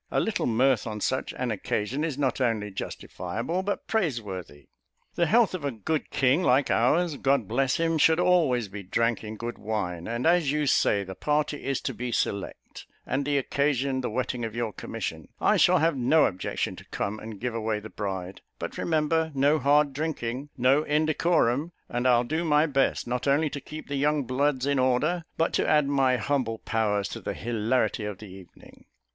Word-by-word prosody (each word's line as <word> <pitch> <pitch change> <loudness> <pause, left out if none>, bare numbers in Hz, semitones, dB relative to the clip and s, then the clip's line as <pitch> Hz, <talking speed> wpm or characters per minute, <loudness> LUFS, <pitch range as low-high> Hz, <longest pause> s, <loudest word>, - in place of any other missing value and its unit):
A - - +1
little 220 - 0
mirth 125 0 +2
on 105 -1 -4
such 130 +5 -1
an 125 -2 -2
occasion, 110 +6 -2
is 155 -5 -2
not 135 -2 0
only 110 -4 0
justifiable, 110 - -4
but 200 +2 -3
praiseworthy. 110 - -3 0.5
The 170 - +1
health 230 -3 +4
of 180 -5 -4
a 140 - 0
good 135 +6 -3
king, 135 +6 +2
like 135 -4 +3
ours, 150 +6 +2
God 135 -6 +1
bless 130 +4 +1
him, 165 -1 +1
should 160 +2 +5
always 160 - +3
be 100 +1 -8
drank 115 +5 0
in 110 0 -6
good 120 +1 -5
wine; 90 -6 -3
and 120 +2 -3
as 165 -4 +3
you 150 0 0
say 100 -6 +2
the 95 0 -7
party 150 +5 -1
is 135 -2 -1
to - - -3
be 125 0 -4
select, 100 -3 -3 0.2
and 135 +2 -1
the 145 0 +1
occasion 140 -1 0
the 125 - -2
wetting 125 +1 -2
of 115 -1 -4
your 115 -3 -2
commission, - - -5
I - - +3
shall 180 +1 +5
have 165 -1 +2
no 135 +5 +4
objection 90 -1 -2
to - - -12
come 105 +2 -3
and 110 -2 -8
give 125 +1 -3
away 110 -1 -1
the 110 +1 -10
bride; 95 -2 -5 0.2
but, - - -6
remember, 160 0 +1
no 145 +3 +3
hard 145 +1 +3
drinking 140 -3 -3
no 130 +4 +4
indecorum 155 -1 +1 0.2
and 120 +1 0
I'll 120 -1 +4
do 155 +7 -2
my 150 -1 +3
best, 135 -3 +1
not 125 +2 -2
only 145 +2 +2
to 140 - -5
keep 155 +3 -9
the 140 - -3
young 145 +1 +1
bloods 130 +1 0
in 140 -1 +1
order, 150 +7 +1
but 165 - +1
to - - +1
add 150 -2 +4
my 135 -2 +2
humble 125 -3 -1
powers 105 -3 0
to - - -7
the - - -4
hilarity 115 0 0
of 105 -2 -5
the 105 -1 -11
evening." 95 -2 -15
130 Hz, 195 wpm, -27 LUFS, 115-150 Hz, 0.5 s, should